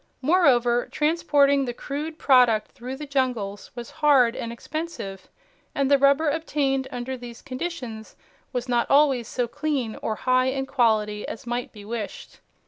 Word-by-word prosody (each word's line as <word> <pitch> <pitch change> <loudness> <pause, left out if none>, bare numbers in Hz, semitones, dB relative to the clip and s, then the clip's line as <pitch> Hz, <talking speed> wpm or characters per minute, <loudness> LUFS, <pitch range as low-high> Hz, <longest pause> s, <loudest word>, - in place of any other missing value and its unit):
Moreover, 250 -7 +3
transporting 290 -3 +2
the 240 -1 -4
crude 300 +5 -5
product 250 -7 +4
through 255 0 -7
the 295 +2 -7
jungles 250 -8 -2
was 240 -1 -7
hard 260 -5 +5
and 230 - -4
expensive 235 - -6 0.5
and 275 0 +1
the 280 - +7
rubber 280 +3 +4
obtained 285 -3 0
under 250 +1 -4
these 240 -2 -10
conditions 255 -6 -6 0.4
was 245 0 -3
not 240 -1 +1
always 275 -5 +4
so 245 -2 -1
clean 270 -5 -2
or 220 - -2
high 255 +2 +2
in 270 +1 -1
quality 220 -5 +1
as 230 - -7
might 240 0 -3
be 205 -2 -12
wished. 220 -1 -6
255 Hz, 150 wpm, -24 LUFS, 235-280 Hz, 0.5 s, the